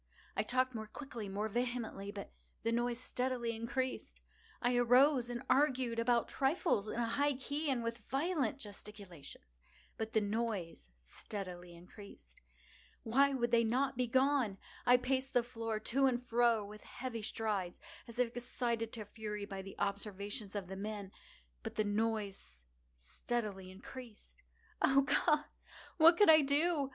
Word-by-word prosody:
I - - +2
talked 255 +3 +1
more 220 -2 -5
quickly—more 215 -6 -4
vehemently; 235 -3 -2
but 200 -1 -7 0.3
the 230 - +1
noise 240 0 0
steadily 250 -2 -1
increased. 255 +3 -3 0.4
I 245 0 +2
arose 245 +1 +5
and 240 -1 -4
argued 260 -5 +2
about 235 0 +2
trifles, 270 - +1
in - - -4
a 235 - +2
high 285 +4 +1
key 285 +3 -2
and 250 -3 0
with 230 +1 -3
violent 275 -3 0
gesticulations; 195 - -10 0.4
but 220 0 -3
the 220 - +5
noise 205 - -2
steadily 175 - -7
increased. 175 - -14 0.6
Why 275 +4 +4
would 240 -2 0
they 235 -1 +5
not 255 +5 +1
be 250 0 0
gone? 260 -4 +2 0.3
I 245 0 +8
paced 260 +1 -1
the 245 - +5
floor 225 -2 -3
to 270 +5 +2
and 245 -2 +1
fro 235 -3 +3
with 210 +1 -10
heavy 245 -3 -6
strides, 210 -4 -2 0.3
as 235 0 -10
if 245 -2 +1
excited 235 -2 -2
to 220 -3 -6
fury 210 -1 -5
by 195 -1 -6
the 195 0 -10
observations 200 +1 -3
of 200 -2 -2
the 190 - -6
men—but 190 - -8
the 215 - +2
noise 205 - -2 0.3
steadily 190 - -3
increased. 215 +4 -11 0.4
Oh 275 +1 +5
God! 300 +2 +3 0.5
what 330 +1 +8
could 415 -5 +8
I 310 -1 +8
do? 290 0 +2
230 Hz, 145 wpm, -35 LUFS, 205-255 Hz, 0.6 s, I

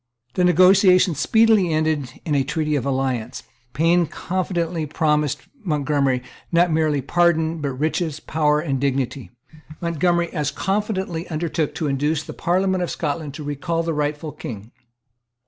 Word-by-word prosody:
The 180 - +1
negotiation 185 +1 +5
speedily 210 +4 +3
ended 155 -5 -1
in 155 - -1
a 140 -2 +3
treaty 150 +2 -1
of 140 -1 -1
alliance, 130 -3 -2 0.3
Payne 170 +2 +3
confidently 175 -3 -2
promised 150 -2 0 0.2
Montgomery, 145 -6 0 0.3
not 170 0 +3
merely 155 -3 +1
pardon, 165 0 +1
but 140 -2 -2
riches, 155 +2 -1
power 150 -1 +1
and 140 -4 -2
dignity. 135 -2 -1 0.5
Montgomery 170 +1 0
as 150 -4 -1
confidently 190 -4 -2
undertook 160 -1 -2
to 160 - -2
induce 145 +3 0
the - - -8
Parliament 185 +1 0
of 175 - -3
Scotland 145 -1 -3
to 155 - -7
recall 165 +4 -2
the 165 0 -1
rightful 150 +1 -2
King. 115 -6 -8
155 Hz, 140 wpm, -22 LUFS, 145-175 Hz, 0.5 s, negotiation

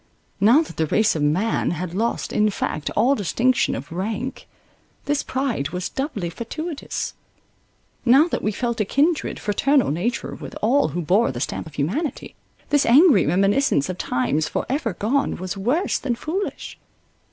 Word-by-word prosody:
Now 235 +11 +5
that - - -12
the 160 - +1
race 215 +5 +2
of 155 - -2
man 175 +10 +1
had 175 0 -4
lost 225 +5 -1
in 215 0 +3
fact 155 -6 -3
all 240 +6 +4
distinction 240 +3 +1
of 140 - -7
rank, 215 +9 -4 0.6
this 290 0 +1
pride 255 - -2
was 180 +1 -4
doubly 245 - -3
fatuitous; 305 - -5 0.9
now 270 +7 +6
that - - -2
we 215 - 0
felt 235 +1 -2
a - - +4
kindred, 300 - +1
fraternal 265 - +2
nature 215 +11 -2
with - - -9
all 265 +6 +3
who 175 - -3
bore 190 - +3
the 120 - -6
stamp 140 - -3
of 155 - -13
humanity, 230 - -2 0.4
this 290 -1 +3
angry 250 - +6
reminiscence 195 - +2
of 185 - -5
times 145 +4 0
for - - -2
ever 255 -6 -1
gone, 245 +10 0
was 185 +1 -5
worse 250 - 0
than 245 -4 -1
foolish. 340 +11 -4
220 Hz, 165 wpm, -22 LUFS, 180-275 Hz, 0.9 s, now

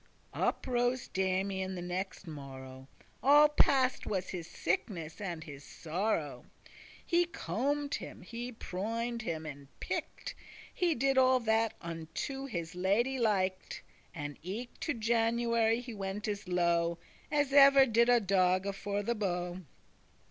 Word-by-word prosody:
Up - - 0
rose 245 0 0
Damian 190 0 -1
the 180 - -5
nexte 185 +2 -4
morrow, 135 -4 -9 0.3
All 295 +2 +7
passed 270 -3 +2
was 190 -3 -2
his 175 -3 -5
sickness 170 -1 -3
and 175 -5 -4
his 145 -3 -10
sorrow. 160 - -2 0.6
He 345 +1 +3
combed 285 -2 -2
him, - - -5
he 235 +5 -6
proined 230 +3 -3
<20> 220 - -2
him 160 -1 -5
and 140 -2 -8
picked, - - -4 0.4
He 345 -3 +1
did 270 +2 +3
all 260 0 +5
that 225 0 +1
unto 170 - -5
his 170 -9 -4
lady 210 +9 +1
liked; 190 -5 0 0.3
And 145 -3 -6
eke 215 +9 -6
to 320 - -1
January 230 0 +2
he 245 -1 -8
went 200 +1 -4
as 205 -2 -3
low 170 -1 +2 0.3
As 290 -2 +1
ever 275 -1 +8
did 235 0 +3
a 245 -1 +6
dogge 190 -1 +2
for 200 +1 -3
the 235 - 0
bow. 180 -4 -2
200 Hz, 140 wpm, -32 LUFS, 175-240 Hz, 0.6 s, ever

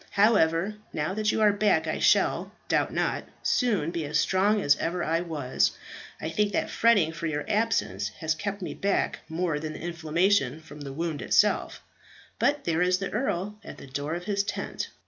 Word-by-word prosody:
However, 200 -2 +3
now 155 +3 -2
that 215 +1 +1
you - - 0
are 210 -1 +5
back 205 -6 +2
I 155 - -2
shall, - - +3 0.2
doubt - - +1
not, - - -1 0.2
soon 205 - +1
be 170 -2 -3
as 150 +1 0
strong 200 +3 +2
as 145 -7 +4
ever 175 +2 -2
I 165 +1 +1
was. 150 -7 0 0.4
I - - -4
think 205 +3 0
that - - -1
fretting 205 -9 +4
for 165 0 -4
your 150 -2 -2
absence 105 - 0
has 160 -1 0
kept 200 +5 -4
me - - -4
back 200 0 0
more 160 -2 -1
than 155 0 -5
the - - -8
inflammation 170 -1 +1
from 150 -2 -12
the 140 -1 -6
wound 160 +1 -3
itself - - +2 0.6
but 290 0 +2
there 165 0 0
is 180 0 +3
the 195 0 -4
Earl 210 -3 -2
at - - -9
the - - -11
door 145 +4 -3
of 175 - -5
his 200 +1 0
tent." 200 - -4
170 Hz, 190 wpm, -27 LUFS, 155-205 Hz, 0.6 s, are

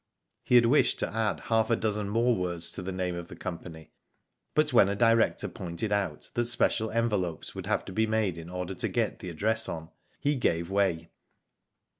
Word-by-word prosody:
He 125 - +2
had 120 -1 +7
wished 135 +6 +3
to - - -2
add 110 -1 0
half 110 0 +1
a 115 - +4
dozen 105 -2 -1
more 115 +3 +2
words 85 -3 -1
to - - -4
the 95 +1 -4
name 90 -1 -2
of 85 -1 -6
the - - -10
company, 85 -3 -7 0.6
but 155 -2 +2
when 100 -5 +6
a 100 - -1
director 115 +1 +3
pointed 90 +5 -5
out 100 -7 -2
that 120 - +1
special 115 -1 +1
envelopes 105 -8 -1
would - - -6
have - - 0
to - - -7
be 110 +3 +2
made 110 -5 +1
in 85 +1 -9
order 90 +1 -4
to - - -2
get - - -1
the 90 - -6
address 110 +7 0
on, 80 -1 -6 0.3
he 145 +1 +1
gave 85 -8 0
way. 90 -5 0
100 Hz, 200 wpm, -28 LUFS, 90-115 Hz, 0.6 s, had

